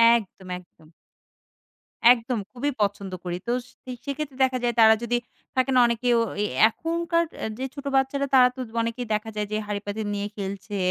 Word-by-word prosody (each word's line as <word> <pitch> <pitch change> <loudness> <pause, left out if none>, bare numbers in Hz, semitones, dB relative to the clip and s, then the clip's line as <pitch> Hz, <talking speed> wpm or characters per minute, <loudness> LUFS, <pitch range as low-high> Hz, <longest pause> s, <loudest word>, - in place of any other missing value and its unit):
একদম 195 -4 -5
একদম। 160 -3 -18 1.2
একদম 235 -1 -3
খুবই 285 +4 -1
পছন্দ 200 -1 -1
করি 175 -1 -3
তো - - +1 0.2
স - - -19 0.4
সেক্ষেত্রে 280 -1 -4
দেখা 255 -1 +2
যায় 240 -1 +1
তারা 220 0 +8
যদি, 240 0 +1 0.4
থাকে 260 +1 +2
না? - - +7
অনেকেও 235 +1 +2 0.2
এ - - +2 0.2
এখনকার 335 +4 0 0.2
এ - - 0
যে 265 - -1
ছোটো 280 -1 -5
বাচ্চারা 275 +1 +1
তারা 250 -1 +8
তো - - -10 0.2
অনেকেই 230 +1 -3
দেখা 215 +1 -1
যায় 210 -1 -2
যে 215 - 0
হাড়িপাতিল 205 +1 -3
নিয়ে 200 0 -2
খেলছে 200 +1 -5
235 Hz, 170 wpm, -25 LUFS, 205-265 Hz, 1.2 s, তারা